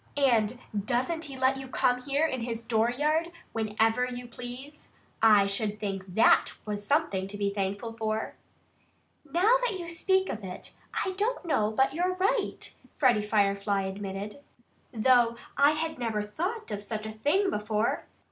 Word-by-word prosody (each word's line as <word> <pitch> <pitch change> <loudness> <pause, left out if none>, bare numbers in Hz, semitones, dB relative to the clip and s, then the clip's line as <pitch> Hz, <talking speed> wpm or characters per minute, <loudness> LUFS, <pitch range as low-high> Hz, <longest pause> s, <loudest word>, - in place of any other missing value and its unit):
And 240 -4 +3 0.3
doesn't 260 - 0
he 275 -2 -7
let 260 +1 +2
you 270 0 -7
come 250 -1 +1
here 280 +4 +1
in 260 -6 -2
his 230 -1 -4
dooryard 280 +9 +1 0.2
whenever 225 +2 +1
you 250 0 -6
please? 250 +5 -9 0.3
I 210 -3 +7
should 205 +1 -2
think 195 -3 -4
THAT 225 - +5
was 205 -1 -2
something 205 -7 +1
to 205 +1 -6
be 200 -1 0
thankful 200 +3 -2
for!" 220 -1 -2 1.0
"Now 400 - +5
that 460 -6 0
you 345 -2 -6
speak 380 +3 +1
of 215 - -5
it, 185 -1 -7 0.3
I 380 - -1
don't 430 0 -1
know 215 -10 +2
but 265 +5 +2
that - - -11
you're 360 +3 0
right," 400 +4 -1 0.2
Freddie 250 -7 +3
Firefly 200 -1 +1
admitted, 195 +4 -5 0.5
"though 240 0 +4 0.2
I 305 +3 +3
never 220 -3 -1
thought 365 - -4
of 205 0 -4
such 215 +1 -4
a 220 - -4
thing 310 - +1
before." 210 +1 -1
235 Hz, 155 wpm, -28 LUFS, 210-300 Hz, 1.0 s, I